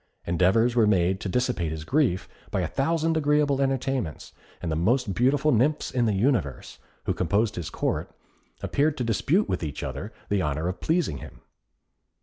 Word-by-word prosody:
Endeavours 95 +8 +3
were 115 -3 +4
made 95 -2 +2
to 100 - -4
dissipate 125 -7 0
his 80 -1 -5
grief 125 - +1 0.2
by - - -1
a - - -1
thousand 165 +3 0
agreeable 145 -2 +2
entertainments, 135 - -2 0.3
and 85 - -3
the - - 0
most 110 +6 +1
beautiful 135 +7 +2
nymphs 135 +6 +1
in 125 -2 +1
the 105 - +1
universe, 95 - -1 0.2
who - - 0
composed 105 +5 0
his 85 -3 -4
Court, - - -2 0.5
appeared 145 +1 +1
to 125 - -1
dispute 140 - +1
with - - -2
each 75 -3 -4
other 70 - -5 0.2
the 100 -2 +1
honour 75 +1 -1
of 90 - -3
pleasing 160 - 0
him. - - -12
115 Hz, 170 wpm, -26 LUFS, 90-140 Hz, 0.5 s, were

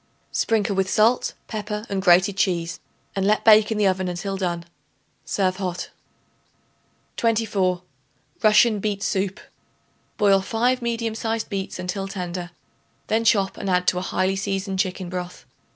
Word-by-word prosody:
Sprinkle 215 -3 +1
with 190 0 +1
salt, 225 +4 +2
pepper 210 0 -4
and 195 -1 -2
grated 185 +1 +5
cheese 170 -4 0 0.4
and 195 - 0
let 215 +1 +2
bake 215 0 +7
in 220 - 0
the 210 - +2
oven 185 -1 +1
until 180 +2 -3
done. 175 -3 -2 0.6
Serve 185 -2 0
hot. 185 -2 -4 1.3
24. 205 -6 +1 0.6
Russian 215 0 +5
Beet 200 -1 -2
Soup. 195 +1 -1 0.8
Boil 195 -2 +4
5 245 +5 0
medium 230 -1 -2
sized 225 0 -2
beets 195 -2 -4
until 185 +2 -3
tender; 180 -2 -5 0.6
then 225 +1 +2
chop 200 -3 +2
and 195 - -4
add 180 0 +2
to 180 - -1
a - - -4
highly 185 +1 0
seasoned 195 0 -2
chicken 185 -1 -1
broth. 180 0 -6
195 Hz, 145 wpm, -23 LUFS, 185-215 Hz, 1.3 s, bake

